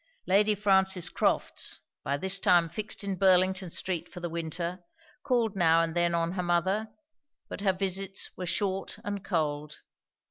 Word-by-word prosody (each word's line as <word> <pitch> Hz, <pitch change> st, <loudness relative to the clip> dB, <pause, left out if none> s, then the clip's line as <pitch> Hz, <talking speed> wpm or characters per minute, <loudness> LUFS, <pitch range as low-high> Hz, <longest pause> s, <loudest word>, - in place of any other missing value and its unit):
Lady 210 Hz, +2 st, +3 dB
Frances 190 Hz, -3 st, +2 dB
Crofts, -, -, -1 dB, 0.2 s
by 140 Hz, +1 st, -1 dB
this 190 Hz, +4 st, 0 dB
time 175 Hz, -3 st, +4 dB
fixed 210 Hz, +5 st, -4 dB
in 195 Hz, -2 st, -3 dB
Burlington 185 Hz, 0 st, +3 dB
street 180 Hz, 0 st, -2 dB
for 180 Hz, -, -8 dB
the 175 Hz, -1 st, -5 dB
winter, 170 Hz, +2 st, -4 dB, 0.4 s
called 240 Hz, -6 st, 0 dB
now 165 Hz, -3 st, +4 dB
and 165 Hz, -1 st, -1 dB
then 175 Hz, 0 st, +2 dB
on 165 Hz, 0 st, 0 dB
her 185 Hz, 0 st, -2 dB
mother; 185 Hz, +5 st, 0 dB, 0.6 s
but -, -, -6 dB
her 200 Hz, -2 st, +3 dB
visits 195 Hz, +1 st, -1 dB
were 180 Hz, -, -5 dB
short 195 Hz, 0 st, -2 dB
and 205 Hz, -1 st, -4 dB
cold. 150 Hz, -4 st, -2 dB
185 Hz, 155 wpm, -29 LUFS, 170-195 Hz, 0.6 s, time